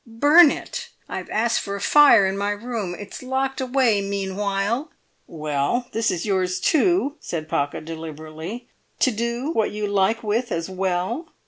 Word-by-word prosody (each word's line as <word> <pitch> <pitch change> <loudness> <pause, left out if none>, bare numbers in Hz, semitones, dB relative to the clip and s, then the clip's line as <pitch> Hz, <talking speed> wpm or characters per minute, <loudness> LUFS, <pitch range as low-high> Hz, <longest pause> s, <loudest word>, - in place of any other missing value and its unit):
"Burn 290 +8 +6
it! - - -5 0.2
I've - - -6
asked 230 +2 +1
for 200 - -4
a - - -5
fire 280 -5 +6
in 190 0 -1
my 200 +1 -1
room; 205 -3 -3
it's 205 -1 -9
locked 265 +1 -2
away 250 -5 +2
meanwhile." 200 - -2 0.4
"Well, 155 - -2
this 225 0 0
is 170 - -2
yours, 185 -3 0
too," 320 -2 +2
said 155 -2 -5
Pocket, 145 0 -2
deliberately, 160 +7 -7 0.3
"to 260 - +3
do 235 +6 -2
what 220 -9 +1
you 210 0 -3
like 205 +3 +1
with 225 +3 -1
as 165 0 -2
well." 190 - -2
210 Hz, 155 wpm, -23 LUFS, 185-245 Hz, 0.4 s, Burn